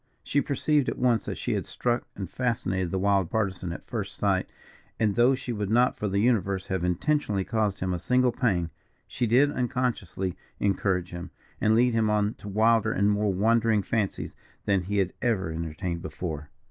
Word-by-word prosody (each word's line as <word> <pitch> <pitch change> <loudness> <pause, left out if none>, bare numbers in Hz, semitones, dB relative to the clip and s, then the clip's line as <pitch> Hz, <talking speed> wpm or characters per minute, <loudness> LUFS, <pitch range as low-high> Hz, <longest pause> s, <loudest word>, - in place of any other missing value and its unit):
She 145 - +1
perceived 145 0 +1
at - - -4
once 120 -4 +2
that - - -4
she - - -2
had - - -2
struck 120 0 -1
and 95 -2 -5
fascinated 95 -7 -1
the 95 - -1
wild 95 -2 +2
Partisan 95 -5 -1
at 85 - -7
first 100 -4 -5
sight, 95 -2 +1 0.5
and 105 -2 +2
though 120 +4 +4
she 130 -2 -5
would 105 -3 -3
not 120 +3 +3
for 105 - -3
the 100 - -1
universe 100 -4 +1
have 95 -2 -1
intentionally 100 - 0
caused 105 -2 -1
him 95 0 0
a 90 - -2
single 125 +6 +2
pang, 95 -10 0 0.4
she 120 - -1
did 135 +6 +4
unconsciously 125 - -2 0.2
encourage 95 -3 0
him, 85 +1 -6 0.3
and 110 +1 +4
lead 120 +1 +4
him 110 -1 +2
on 105 0 +1
to 100 - -8
wilder 110 +2 +3
and 100 -1 +2
more 105 0 +1
wandering 110 +2 +2
fancies 105 -3 -2 0.3
than 100 -2 +2
he 100 +3 -2
had 95 -2 +1
ever 100 -8 0
entertained 85 +2 -4
before. 80 -5 -5
105 Hz, 185 wpm, -27 LUFS, 95-120 Hz, 0.5 s, though